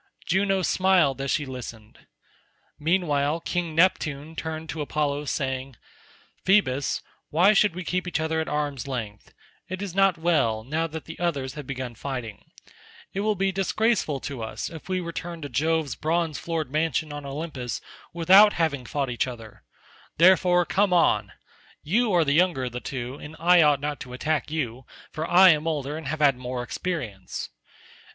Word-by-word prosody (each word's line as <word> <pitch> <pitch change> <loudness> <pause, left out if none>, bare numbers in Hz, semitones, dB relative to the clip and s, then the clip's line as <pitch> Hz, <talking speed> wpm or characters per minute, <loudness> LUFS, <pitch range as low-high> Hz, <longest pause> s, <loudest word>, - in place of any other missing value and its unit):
Juno 190 +1 +1
smiled 175 -8 +3
as 135 - -3
she 145 - 0
listened. 120 -4 -9 0.7
Meanwhile 155 -2 +1
King 170 -2 -2
Neptune 160 -4 +1
turned 160 0 -5
to 155 - -4
Apollo 145 0 -1
saying, 130 -2 -3 0.7
"Phoebus, 145 -9 +2 0.3
why 180 +7 +5
should 205 -3 +3
we 185 - -5
keep 180 +2 -2
each 175 - -1
other 160 0 0
at 160 - -4
arm's 145 -4 -2
length? 115 -6 -6 0.3
it 185 +1 -4
is 200 -3 -5
not 195 -2 +3
well, 155 -10 +1
now 155 +7 -1
that 160 -1 -7
the 165 - -9
others 140 -7 -1
have 150 -3 -8
begun 130 -3 -5
fighting; 120 -4 -6 0.7
it 195 - -3
will 215 +1 +1
be 195 0 +1
disgraceful 195 -5 0
to 135 -5 -5
us 110 - -5
if 165 +2 -10
we 185 -1 0
return 170 0 -5
to 145 - -5
Jove's 155 +1 0
bronze 160 +4 -1
floored 160 -5 -3
mansion 155 0 0
on 145 0 -6
Olympus 140 -3 -5 0.3
without 190 +5 +6
having 150 -6 -1
fought 140 -3 -2
each 120 - 0
other; 115 -4 -9 0.6
therefore 180 0 +5
come 195 +1 +2
on, 105 - +3 0.5
you 220 +8 +2
are 175 -3 +3
the 140 - +2
younger 170 -4 +3
of 125 - -3
the 125 - -4
two, 125 +1 -5
and 150 +2 -9
I 175 +2 +5
ought 150 -3 +4
not 145 0 -3
to 125 - -9
attack 150 +4 -1
you, 130 -5 -4 0.2
for 155 +2 -4
I 185 +2 +8
am 155 0 0
older 145 -2 -2
and 160 -3 -6
have 155 +2 -3
had 140 -3 +4
more 125 0 -4
experience. 120 - -4
155 Hz, 170 wpm, -25 LUFS, 135-175 Hz, 0.7 s, I